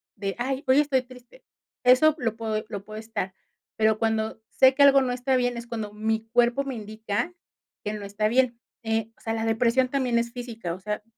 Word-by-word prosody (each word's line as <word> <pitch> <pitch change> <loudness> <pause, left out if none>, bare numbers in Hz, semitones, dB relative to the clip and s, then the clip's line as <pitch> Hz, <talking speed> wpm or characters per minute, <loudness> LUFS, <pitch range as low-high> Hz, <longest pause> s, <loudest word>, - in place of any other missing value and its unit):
de: 195 -1 -3
"Ay, 265 +2 -2
hoy 260 +2 +5
estoy 285 -3 +2
triste", 250 - -16 0.4
eso, 255 +5 +6
lo 225 -6 -1
puedo 220 -1 -2
lo 200 -1 -5
puedo 215 0 -8
estar, 220 -4 -4 0.4
pero 220 0 +2
cuando 220 -1 -1
sé 260 0 +5
que 285 +2 +4
algo 275 -1 +7
no 255 -1 0
está 250 +2 0
bien, 245 -1 +1
es 235 0 -7
cuando 220 -3 -4
mi 220 +1 -1
cuerpo 240 +3 +3
me 270 -2 -4
indica, 215 +7 -3 0.5
que 210 - -3
no 210 -1 -6
está 205 +2 -1
bien. 240 0 +2 0.2
Eh, 225 0 -1
o - - -25
sea, 225 - -2
la 225 0 -2
depresión 235 +3 +2
también 255 -3 +1
es 235 0 0
física, 230 -8 -5
o 180 - -8
sea, 210 +2 -4
230 Hz, 210 wpm, -26 LUFS, 220-255 Hz, 0.5 s, algo